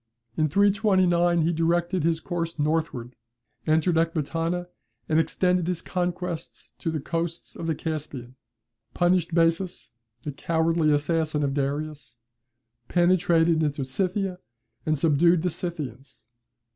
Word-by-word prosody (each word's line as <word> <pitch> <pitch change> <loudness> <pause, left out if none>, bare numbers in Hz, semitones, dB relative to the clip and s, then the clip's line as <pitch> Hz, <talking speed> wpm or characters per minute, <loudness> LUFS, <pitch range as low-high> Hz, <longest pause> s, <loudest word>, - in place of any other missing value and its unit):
In 155 -1 +1
329, 185 -3 +3
he 170 +2 +1
directed 170 +2 +1
his 165 0 +1
course 170 0 -4
northward, 150 -5 -1 0.5
entered 160 +2 +3
Ecbatana, 165 +2 -1 0.4
and 155 - +3
extended 180 +1 +1
his 180 -2 -1
conquests 175 -1 -4
to 165 - -2
the 160 -1 -2
coasts 165 +3 -4
of 165 - -5
the 160 - 0
Caspian, 145 -6 -5 0.6
punished 175 -1 +2
Bessus, 170 -2 +1 0.3
the 150 - -3
cowardly 160 +2 +1
assassin 150 0 +1
of 140 -1 0
Darius, 145 -2 -3 0.7
penetrated 170 -2 +3
into 145 -3 -1
Scythia, 185 +6 -1 0.5
and 155 0 +2
subdued 165 +3 +3
the 180 - +1
Scythians. 140 -7 -6
165 Hz, 120 wpm, -26 LUFS, 155-175 Hz, 0.7 s, 329